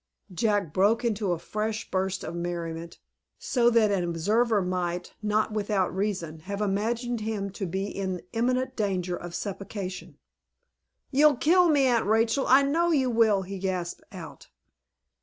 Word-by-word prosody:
Jack 205 -5 0
broke 210 +6 +3
into 210 -4 0
a 175 - 0
fresh 215 +5 -4
burst 190 0 -1
of 160 - -5
merriment, 170 -1 -5 0.4
so 240 -2 +2
that 225 -3 +3
an 195 -3 +1
observer 210 +7 +1
might, 180 -1 -2
not 210 +1 +1
without 205 -3 0
reason, 185 -6 -2
have 200 +5 -6
imagined 225 +4 -1
him 210 -2 -3
to 195 0 -4
be 190 +3 -2
in 190 -3 -4
imminent 255 +3 0
danger 185 -4 -1
of 175 -1 -7
suffocation. 195 -1 -6 0.9
"You'll 290 +1 +5
kill 355 +5 +4
me, 285 -3 +4
Aunt 240 -5 +2
Rachel; 225 +4 +2
I 270 +2 +6
know 330 +5 +2
you 265 -6 +2
will," 220 -4 +3
he 195 +1 -6
gasped 180 -2 -3
out. - - -10
205 Hz, 150 wpm, -27 LUFS, 185-230 Hz, 0.9 s, I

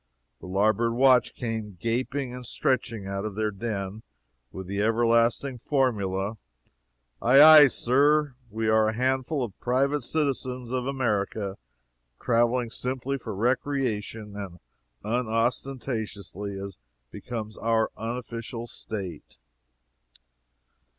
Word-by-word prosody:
the - - -10
larboard 110 +4 +2
watch 130 0 +4
came 110 -5 -4
gaping 125 +4 -2
and 125 -1 -7
stretching 120 -5 -1
out 100 0 -3
of 105 -2 -4
their 110 0 0
den, 105 -1 -4 0.5
with 95 - -7
the 100 +2 -2
everlasting 115 +3 +2
formula: 110 -7 0 0.8
"Aye 130 +4 +6
aye, 155 -2 +10
sir! 145 +4 +2 0.2
We 110 +1 -2
are 110 0 +4
a - - -2
handful 130 +3 0
of 105 -5 -7
private 140 +4 +1
citizens 130 -3 -2
of 130 0 -1
America, 105 -6 -1 0.6
traveling 120 0 +1
simply 130 +2 -3
for 110 -4 -6
recreation, 115 -3 -1
and 100 -4 -7 0.5
unostentatiously, 110 -3 -2
as 100 -1 -7 0.3
becomes 110 -3 -6
our 115 -1 +1
unofficial 115 0 -5
state!" 95 - -7
115 Hz, 110 wpm, -26 LUFS, 105-130 Hz, 0.8 s, aye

